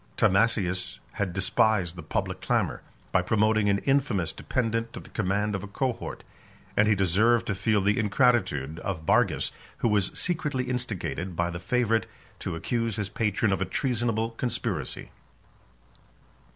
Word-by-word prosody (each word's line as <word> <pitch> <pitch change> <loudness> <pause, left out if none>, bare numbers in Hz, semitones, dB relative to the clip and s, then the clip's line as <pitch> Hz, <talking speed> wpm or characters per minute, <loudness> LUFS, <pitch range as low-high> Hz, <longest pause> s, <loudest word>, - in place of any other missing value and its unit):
Timasius 95 -2 +2 0.2
had 100 -3 -1
despised 95 -1 +2
the 90 - -7
public 75 - -3
clamor, - - 0 0.3
by - - +4
promoting 110 -1 +2
an 100 - +3
infamous 135 - +1
dependant 115 -2 -1
to - - -6
the - - -13
command 105 0 0
of 95 - -2
a 105 - -7
cohort; 125 +5 -3 0.5
and 105 - +4
he 105 - +4
deserved 105 +6 +3
to 100 - -1
feel 105 +1 +1
the 100 +2 +2
ingratitude 105 - +2
of 85 -5 -4
Bargus, - - +2 0.3
who - - +1
was 105 -3 +2
secretly 150 -7 0
instigated 110 -8 -3
by 85 +1 0
the 85 - -5
favorite 115 +3 +1 0.3
to - - -4
accuse 115 +5 -1
his 105 -2 -3
patron 105 -1 +1
of 95 - -2
a - - +2
treasonable 115 +1 0
conspiracy. 115 - -3
105 Hz, 150 wpm, -27 LUFS, 95-115 Hz, 0.5 s, by